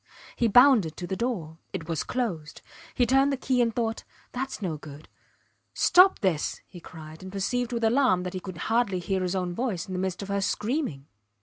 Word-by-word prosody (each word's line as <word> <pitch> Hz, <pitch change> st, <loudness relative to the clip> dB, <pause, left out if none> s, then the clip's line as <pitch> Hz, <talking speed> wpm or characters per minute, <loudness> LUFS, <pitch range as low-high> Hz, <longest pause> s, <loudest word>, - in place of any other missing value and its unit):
He 235 Hz, -, +2 dB
bounded 225 Hz, -, +5 dB
to 180 Hz, -, -5 dB
the 190 Hz, -, -3 dB
door. 185 Hz, -9 st, -3 dB
It 165 Hz, -, -5 dB
was 165 Hz, -3 st, -1 dB
closed. 180 Hz, -12 st, -4 dB, 0.3 s
He 245 Hz, -, +3 dB
turned 270 Hz, +3 st, +3 dB
the 275 Hz, -, -1 dB
key 255 Hz, -1 st, +1 dB
and 235 Hz, -1 st, +2 dB
thought: 225 Hz, -1 st, -2 dB, 0.3 s
thats 265 Hz, +2 st, -4 dB
no 180 Hz, -6 st, -3 dB
good.... 150 Hz, 0 st, -11 dB, 0.7 s
Stop 370 Hz, +2 st, +5 dB
this! 180 Hz, -7 st, 0 dB
he 180 Hz, -, -12 dB
cried, 160 Hz, -1 st, -11 dB
and 190 Hz, 0 st, -9 dB
perceived 240 Hz, +5 st, -1 dB
with 235 Hz, -1 st, -2 dB
alarm 225 Hz, -5 st, +3 dB
that 180 Hz, -, -5 dB
he 185 Hz, -, -3 dB
could 185 Hz, -2 st, -8 dB
hardly 225 Hz, -2 st, 0 dB
hear 190 Hz, +2 st, -2 dB
his 180 Hz, +1 st, -1 dB
own 180 Hz, -2 st, -2 dB
voice 200 Hz, -5 st, -2 dB
in 190 Hz, -, -7 dB
the 180 Hz, -, -2 dB
midst 190 Hz, +1 st, -3 dB
of 200 Hz, -, -9 dB
her 200 Hz, 0 st, 0 dB
screaming. 210 Hz, -, -2 dB
195 Hz, 205 wpm, -27 LUFS, 175-245 Hz, 0.7 s, bounded